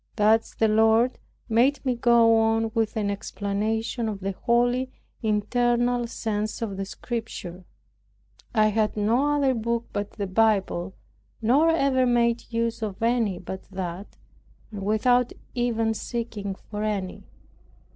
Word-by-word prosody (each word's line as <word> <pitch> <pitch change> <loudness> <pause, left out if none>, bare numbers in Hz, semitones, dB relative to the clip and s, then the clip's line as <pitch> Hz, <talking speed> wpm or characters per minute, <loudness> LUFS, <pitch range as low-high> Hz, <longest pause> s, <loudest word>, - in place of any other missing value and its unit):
Thus 220 +1 +2
the 225 - +2
Lord 225 +3 +3 0.3
made 255 +5 +2
me 255 - +2
go 235 -1 +4
on 225 0 +1
with 225 -1 0
an 205 -2 0
explanation 220 +3 -2
of 205 -2 -5
the 195 +1 -2
holy 245 +5 +1 0.3
internal 240 +3 +1
sense 215 -2 -3
of 205 -4 -4
the 195 0 -3
Scriptures. 195 -5 -6 0.9
I 215 -1 +3
had 215 0 0
no 245 +8 +2
other 275 -2 +2
book 235 0 -1
but 205 0 -3
the 200 - -3
Bible, 195 -3 +1 0.4
nor 270 +9 +4
ever 275 -5 +2
made 235 -1 +1
use 230 0 -1
of 215 0 -4
any 230 -5 +1
but 190 +1 -7
that, 185 0 -6 0.5
and 205 -2 -6
without 240 +4 +2 0.2
even 230 -2 0
seeking 220 -4 -4
for 210 +2 -8
any. 205 -3 -3
225 Hz, 135 wpm, -25 LUFS, 205-240 Hz, 0.9 s, go